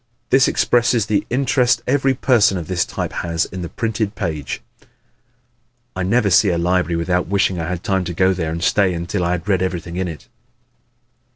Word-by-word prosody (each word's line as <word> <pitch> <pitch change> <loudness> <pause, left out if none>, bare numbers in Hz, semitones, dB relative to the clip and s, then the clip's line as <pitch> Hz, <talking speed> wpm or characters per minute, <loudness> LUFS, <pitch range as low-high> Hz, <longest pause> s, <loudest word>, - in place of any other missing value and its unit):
This 135 +1 +5
expresses 120 -2 +2
the 105 -2 -1
interest 125 -1 +1
every 135 0 +1
person 120 -7 +3
of 85 - -5
this 90 -1 0
type - - -4
has 85 -1 -1
in 95 - -7
the 85 - -5
printed 110 -2 -2
page. 75 -5 -4 1.4
"I 95 - -3
never 100 +2 +2
see 100 +3 +5
a 85 - 0
library 90 0 +1
without 90 +2 0
wishing 95 -1 +1
I 80 - -3
had 90 -1 -4
time 95 -1 0
to 85 - -4
go 95 +1 +3
there 80 -3 -3
and 85 +1 -4
stay 95 -1 +2
till 90 +1 -2
I 85 +1 +1
had 90 +1 -4
read 95 -3 +1
everything 90 -2 -3
in 95 0 -1
it." 80 +4 -8
95 Hz, 190 wpm, -19 LUFS, 85-110 Hz, 1.4 s, This